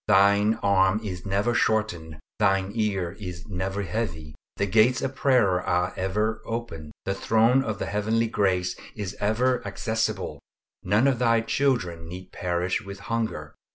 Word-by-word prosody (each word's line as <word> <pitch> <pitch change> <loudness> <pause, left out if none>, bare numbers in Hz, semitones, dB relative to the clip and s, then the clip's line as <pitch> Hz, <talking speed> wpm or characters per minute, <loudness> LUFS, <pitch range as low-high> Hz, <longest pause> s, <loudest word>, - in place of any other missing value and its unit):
Thine 100 +2 +5
arm 95 0 +3
is 95 -2 -5
never 100 +5 +1
shortened, 90 -10 0 0.2
Thine 95 0 +2
ear 100 -5 -1
is 90 -2 -7
never 95 +1 -3
heavy. 85 -7 -4 0.2
The 100 - +1
gates 110 +6 +3
of 135 - -2
prayer 120 -10 +3
are 90 +1 0
ever 105 +4 -1
open. 100 -10 -5
The 95 - 0
Throne 115 +6 +3
of 110 -5 -3
the - - -3
Heavenly 110 +3 0
Grace 95 -5 0 0.2
is 100 -2 -5
ever 120 +5 +1
accessible, 110 0 -2 0.4
none 105 +7 +2
of 130 -4 +1
Thy 115 -2 +3
children 115 -11 0
need 90 +2 -9
perish 90 +4 -1
with 100 -2 -9
hunger! 110 -10 -2
100 Hz, 150 wpm, -26 LUFS, 90-110 Hz, 0.4 s, Thine